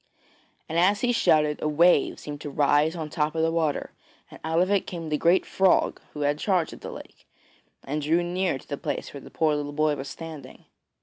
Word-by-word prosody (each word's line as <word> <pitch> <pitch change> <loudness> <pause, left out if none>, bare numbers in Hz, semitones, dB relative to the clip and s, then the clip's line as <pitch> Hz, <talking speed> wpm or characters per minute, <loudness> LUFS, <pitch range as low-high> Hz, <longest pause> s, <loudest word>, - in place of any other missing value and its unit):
And 165 +2 0
as 200 +4 +3
he 245 - +2
shouted 150 -9 +2
a - - 0
wave 160 +1 +3
seemed 145 0 -7
to 145 - -5
rise 145 +3 +2
on 160 -2 -4
the - - -12
top 155 -1 0
of 160 - +1
the 165 - +2
water, 160 -3 -1 0.4
and - - -12
out 160 +1 0
of 185 +2 +2
it 200 -2 +1
came 165 -3 -6
the 150 - 0
great 175 +3 +3
frog 190 -1 +2
who 150 - -6
had 145 +1 +1
charge 180 -5 0
of - - -11
the - - -7
lake, - - -12 0.6
and 150 +3 -3
drew 165 +4 +2
near 180 -3 -1
to - - -17
the 145 - -4
place - - -4
where 140 - -8
the - - -12
poor 155 -2 +1
little 145 0 -4
boy 155 0 +1
was 135 -1 -6
standing. 160 -3 -10
155 Hz, 230 wpm, -26 LUFS, 150-175 Hz, 0.6 s, as